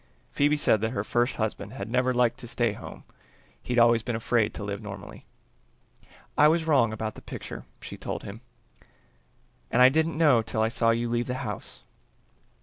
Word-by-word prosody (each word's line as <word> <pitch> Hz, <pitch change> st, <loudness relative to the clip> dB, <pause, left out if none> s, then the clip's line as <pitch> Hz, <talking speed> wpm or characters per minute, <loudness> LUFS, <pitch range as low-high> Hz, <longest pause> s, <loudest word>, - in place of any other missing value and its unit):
Phoebe 145 Hz, +1 st, +2 dB
said 110 Hz, -7 st, +3 dB
that 110 Hz, +2 st, -1 dB
her 100 Hz, -, -2 dB
first 120 Hz, +3 st, 0 dB
husband 110 Hz, -1 st, -3 dB
had 105 Hz, -6 st, -6 dB
never 125 Hz, +2 st, +1 dB
liked 120 Hz, -1 st, +1 dB
to 120 Hz, -, -7 dB
stay 115 Hz, -2 st, 0 dB
home, -, -, -10 dB, 0.6 s
he'd 125 Hz, -, -3 dB
always 115 Hz, -1 st, +5 dB
been 120 Hz, +1 st, -3 dB
afraid 115 Hz, -1 st, +1 dB
to -, -, -6 dB
live 100 Hz, +1 st, -4 dB
normally. 105 Hz, -2 st, -9 dB, 1.1 s
"I 150 Hz, -, +6 dB
was 160 Hz, +1 st, +2 dB
wrong 135 Hz, -8 st, +3 dB
about 110 Hz, 0 st, -4 dB
the -, -, -12 dB
picture," -, -, -8 dB, 0.2 s
she -, -, -8 dB
told -, -, -5 dB
him, 105 Hz, +4 st, -9 dB, 1.3 s
"and 120 Hz, -, +1 dB
I 125 Hz, +1 st, +9 dB
didn't 160 Hz, +3 st, 0 dB
know 145 Hz, -8 st, +5 dB
till 110 Hz, 0 st, -1 dB
I 110 Hz, -, +2 dB
saw 115 Hz, 0 st, +1 dB
you 115 Hz, +1 st, +1 dB
leave 120 Hz, +1 st, -1 dB
the 125 Hz, -, -2 dB
house." -, -, -6 dB
120 Hz, 185 wpm, -27 LUFS, 110-130 Hz, 1.3 s, I